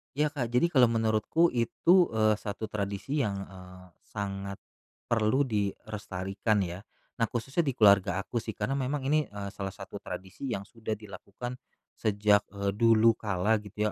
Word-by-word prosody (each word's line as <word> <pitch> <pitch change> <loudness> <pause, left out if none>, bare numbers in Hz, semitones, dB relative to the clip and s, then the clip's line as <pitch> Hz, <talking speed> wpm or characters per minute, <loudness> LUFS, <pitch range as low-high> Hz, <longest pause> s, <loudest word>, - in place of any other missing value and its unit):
Ya, 150 +1 +1
Kak, 135 -6 -2
jadi 125 +9 +2
kalau 130 -5 +6
menurutku 115 +9 +2
itu, 170 +10 +3
eee, 110 -1 +3
satu 105 +1 -5
tradisi 100 +8 -2
yang, 105 -7 0
eee, 90 -1 -13 0.2
sangat 100 -1 -4 0.6
perlu 115 +4 +3
dilestarikan 105 -2 -2
ya. 90 0 -5 0.4
Nah, 115 - +3
khususnya 135 - -1
di 135 - 0
keluarga 100 -2 +4
aku 120 - -2
sih, 110 -2 -6
karena 135 +7 -1
memang 135 +2 -2
ini, 150 +2 +2
eee, 100 -1 -6
salah 95 -1 -5
satu - - -8
tradisi 95 +8 -7
yang 100 -6 -2
sudah 110 +1 -5
dilakukan 105 +4 -8 0.4
sejak, 105 -1 +3
eee, 100 0 -2
dulu 115 +2 +5
kala 105 -1 0
gitu 105 +1 -2
110 Hz, 155 wpm, -29 LUFS, 100-120 Hz, 0.6 s, kalau